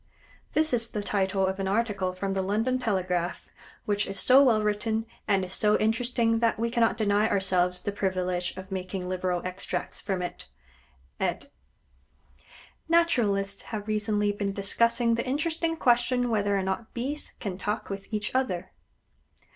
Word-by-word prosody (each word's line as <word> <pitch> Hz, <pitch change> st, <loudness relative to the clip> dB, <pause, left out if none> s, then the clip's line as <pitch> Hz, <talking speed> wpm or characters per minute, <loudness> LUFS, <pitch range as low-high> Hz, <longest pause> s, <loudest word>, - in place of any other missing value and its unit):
[This 310 Hz, -2 st, +3 dB
is 230 Hz, -1 st, +2 dB
the 210 Hz, -, -3 dB
title 195 Hz, -1 st, +1 dB
of 190 Hz, +1 st, -2 dB
an 195 Hz, -, -1 dB
article 200 Hz, -3 st, 0 dB
from 195 Hz, +1 st, -3 dB
the 190 Hz, -, 0 dB
London 220 Hz, +7 st, 0 dB
Telegraph, 185 Hz, -6 st, -1 dB, 0.4 s
which 205 Hz, 0 st, 0 dB
is 195 Hz, -1 st, -4 dB
so 260 Hz, +2 st, +7 dB
well 225 Hz, -5 st, +4 dB
written, 220 Hz, +1 st, 0 dB, 0.2 s
and 195 Hz, -3 st, +2 dB
is 185 Hz, -, -5 dB
so 210 Hz, +1 st, +4 dB
interesting 230 Hz, +1 st, +1 dB
that 230 Hz, 0 st, +2 dB
we 230 Hz, +1 st, -1 dB
cannot 230 Hz, -2 st, +2 dB
deny 210 Hz, -1 st, +2 dB
ourselves 180 Hz, -2 st, +2 dB
the 205 Hz, -, -2 dB
privilege 185 Hz, -2 st, -1 dB
of 190 Hz, +1 st, -9 dB
making 185 Hz, -1 st, -4 dB
liberal 180 Hz, -1 st, -1 dB
extracts 185 Hz, +1 st, -3 dB
from 190 Hz, -3 st, -2 dB
it.] 175 Hz, -, -6 dB, 0.7 s
Ed. 190 Hz, +9 st, -2 dB, 1.4 s
Naturalists 210 Hz, -13 st, +2 dB
have 215 Hz, -2 st, -5 dB
recently 210 Hz, -1 st, +1 dB
been 200 Hz, -1 st, -2 dB
discussing 230 Hz, +4 st, +2 dB
the 235 Hz, +2 st, -1 dB
interesting 325 Hz, +4 st, 0 dB
question 245 Hz, -1 st, +2 dB
whether 205 Hz, -2 st, +1 dB
or 195 Hz, -, 0 dB
not 190 Hz, +4 st, -4 dB
Bees 275 Hz, +5 st, -4 dB
can 190 Hz, -4 st, -4 dB
talk 210 Hz, +2 st, -3 dB
with 195 Hz, +2 st, -7 dB
each 210 Hz, -1 st, -2 dB
other. 185 Hz, -9 st, -1 dB
205 Hz, 155 wpm, -27 LUFS, 190-230 Hz, 1.4 s, so